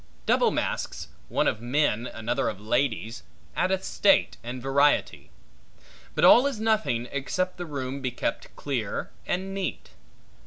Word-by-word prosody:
Double - - +4
masques, - - -3 0.2
one - - +1
of 110 - 0
men, 120 -2 +1
another 115 +4 -1
of 100 - -6
ladies, 115 +1 -1 0.3
addeth 190 +1 +1
state 195 -1 +3
and 120 +2 -5
variety. 140 +3 +2 0.9
But - - +4
all 250 +4 +8
is 275 -6 -3
nothing 215 - +1
except 185 +7 -2
the 175 -1 -5
room 135 -2 -4
be 130 - -1
kept 120 -1 -4
clear 125 -8 -3 0.2
and 190 +2 -2
neat. 195 -1 -4
140 Hz, 140 wpm, -26 LUFS, 120-185 Hz, 0.9 s, all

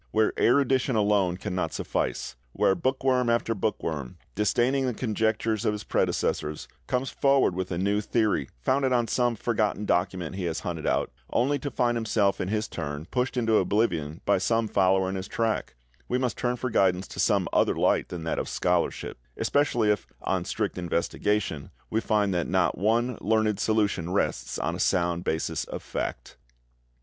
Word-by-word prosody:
Where 110 0 +2
erudition 130 0 +3
alone 100 -4 +2
cannot 90 0 -3
suffice; - - -2 0.2
where - - +3
bookworm 130 +1 +1
after 115 -1 +1
bookworm, 80 - -3 0.2
disdaining 125 - +1
the 125 - -2
conjectures 110 -2 0
of 105 - +1
his 105 -1 -5
predecessors, 75 0 -1 0.2
comes 125 +1 -1
forward 135 -8 +3
with 95 +1 -3
a 85 - -1
new 100 +3 +1
theory 105 - 0
founded 130 - +2
on 120 -2 +2
some 120 +1 +1
forgotten 105 -2 -1
document 90 -1 -1
he 95 - -2
has 80 -1 -2
hunted 85 -3 -4
out, - - +1 0.2
only 140 +4 +2
to 145 - -3
find 120 -3 +1
himself 110 -3 +1
in - - -2
his 105 +2 -1
turn 75 -1 -5
pushed 125 0 -1
into 115 -3 +3
oblivion 85 -8 0
by - - +3
some 115 +3 +1
follower 95 -2 +3
in 95 - -2
his 95 -1 -4
track, 115 -2 -1 0.3
we 125 - 0
must 125 -3 -1
turn 120 0 -1
for 125 0 -3
guidance 95 -3 +2
to - - -8
some - - +2
other - - +3
light - - +2
than 85 -2 -6
that 80 - -1
of - - -3
scholarship; - - -1 0.2
especially 120 -7 +2
if, 105 - -2 0.2
on - - -1
strict - - -2
investigation, 90 -1 -1 0.2
we 110 - +1
find 105 -3 +1
that 85 -1 0
not - - +2
one 115 +5 +1
learned 110 0 +1
solution 100 -6 +1
rests 100 - -1
on - - -1
a - - -7
sound 85 -1 +1
basis 80 - -1
of - - -7
fact. - - -5
105 Hz, 175 wpm, -27 LUFS, 90-120 Hz, 0.3 s, erudition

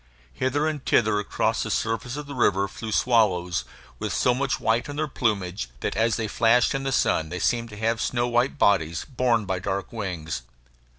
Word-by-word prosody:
Hither 140 - 0
and 150 -3 -3
thither 110 -3 +3
across 105 - 0
the - - -3
surface 115 +4 -1
of 150 - -5
the 145 - -8
river 100 -6 +2
flew 110 +3 -7
swallows, 95 -7 +2 0.3
with - - -3
so 125 - +2
much 135 +1 -1
white 115 +5 +1
in 145 - -5
their 155 +1 -1
plumage 100 - -1
that - - -2
as 115 +2 +2
they 110 - -2
flashed 115 +3 +3
in 135 - -1
the 135 0 -2
sun 80 -10 +1
they 90 - -4
seemed 115 +4 0
to 105 - -10
have 115 +2 0
snow 120 -1 0
white 120 +4 +1
bodies, 85 - +2
borne 120 -4 +1
by 95 -2 -2
dark 95 +2 -3
wings. 90 -8 -4
115 Hz, 195 wpm, -25 LUFS, 100-125 Hz, 0.3 s, thither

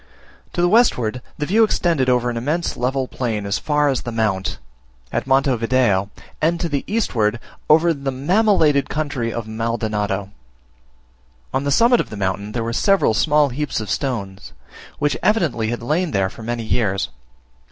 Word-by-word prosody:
To 175 - 0
the 175 - +4
westward 125 - +2 0.2
the 150 - -2
view 215 +8 +4
extended 165 -10 +1
over 125 -1 +2
an - - -5
immense 150 +9 -1
level 130 +1 -1
plain 110 -6 -3
as 100 - -1
far 150 -1 +1
as 135 -3 0
the 120 - -5
Mount, 105 -4 -1 0.5
at - - -2
Monte 135 0 +3
Video, 115 -5 +1 0.3
and 165 +2 +2
to 170 - -1
the 145 -4 -2
eastward, 120 - 0 0.3
over 165 +2 +5
the 140 -2 -4
mammillated 150 0 +2
country 145 -6 -2
of 115 -1 -4
Maldonado. 110 -3 -2 1.2
On 140 - 0
the - - 0
summit 235 - +5
of - - -2
the 105 - -7
mountain 100 +2 -2
there 115 - -2
were 115 +1 -3
several 195 - +3
small 150 +4 +3
heaps 140 +1 -3
of 110 - -5
stones, 100 -8 -3 0.4
which 145 -1 0
evidently 170 - +1
had 120 +1 -3
lain 160 +7 0
there 95 -4 0
for - - -12
many 120 +1 -3
years. 105 -4 0
130 Hz, 170 wpm, -20 LUFS, 110-150 Hz, 1.2 s, over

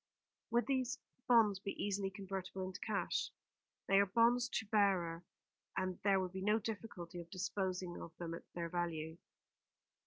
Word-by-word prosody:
"Would 240 +1 +3
these 260 0 +1 0.3
bonds 220 -5 +6
be 195 +1 -3
easily 200 -1 0
convertible 190 -1 -4
into 185 +1 -6
cash?" 210 -2 0 0.6
"They 195 0 +5
are 200 - +5
bonds 235 +4 +4
to 225 - -1
bearer, 190 -6 +2 0.5
and 185 -1 -1
there 195 -1 +4
would 185 -1 -1
be 190 - -4
no 210 +3 +4
difficulty 200 -6 -5
of 170 - -12
disposing 185 -1 -2
of 165 0 -9
them 170 -1 -4
at 165 - -9
their 170 -1 -1
value." 165 -1 -2
195 Hz, 155 wpm, -38 LUFS, 175-210 Hz, 0.6 s, bonds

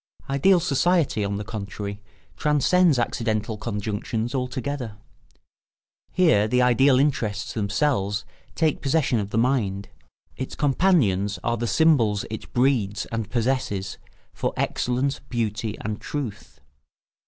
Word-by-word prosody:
Ideal 175 +7 +4
society, 165 - +1
on 100 0 -2
the 105 - -4
contrary, 100 -1 -6 0.3
transcends 150 +2 +3
accidental 110 -2 -1
conjunctions 110 +2 -3
altogether. 125 -3 -3 1.1
Here 160 - +4
the 125 +3 +2
ideal 125 +2 +4
interests 115 -6 0
themselves 105 0 0 0.3
take 160 -3 +1
possession 135 -4 +1
of 100 -1 -3
the 110 - -2
mind; 110 -6 0 0.5
its 130 - -5
companions 130 - +2
are 120 - +1
the 120 +1 -2
symbols 115 -10 +3
it 110 - -7
breeds 120 -6 +1
and 115 -2 -3
possesses 120 -5 -1 0.3
for - - -2
excellence, 130 +3 0
beauty, 110 -2 -2
and 105 0 -4
truth. 125 - -6
120 Hz, 115 wpm, -24 LUFS, 105-140 Hz, 1.1 s, Ideal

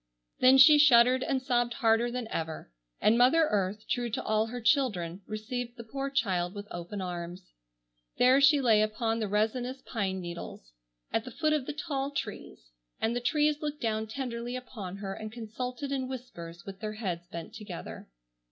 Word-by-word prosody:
Then 255 +1 +7
she 295 +2 +9
shuddered 255 -2 +6
and 260 0 -1
sobbed 240 -2 +1
harder 230 -1 +3
than 245 -1 -4
ever. 160 - -4 0.3
And 225 +3 +4
mother 305 +6 +5
earth, 205 +1 -1
true 240 -1 -1
to 230 - -3
all 215 +1 +1
her 245 +2 -5
children, 205 - +1
received 235 +3 -5
the 235 - -7
poor 275 +4 -4
child 190 -9 0
with 205 0 -6
open 175 +3 -5
arms. 175 0 -6 0.7
There 255 +2 +5
she 285 +1 +6
lay 225 -4 +5
upon 225 +1 0
the 215 - -1
resinous 240 +6 -1
pine 195 -5 -2
needles, 170 - -8 0.4
at 225 - +1
the 255 - -8
foot 305 +5 0
of 295 -4 -1
the 300 - -3
tall 285 -3 -3
trees, - - -6 0.3
and 225 +2 0
the 245 - -1
trees 300 +3 +1
looked 300 -1 -3
down 220 -2 -1
tenderly 240 0 -4
upon 210 -7 -7
her 195 -1 -5
and 215 +2 -7
consulted 250 +4 -5
in 265 -2 -1
whispers 175 -10 -8
with 195 -1 -8
their 215 0 -4
heads 180 -6 -4
bent 170 -2 -8
together. 205 -5 -8
230 Hz, 180 wpm, -29 LUFS, 200-260 Hz, 0.7 s, she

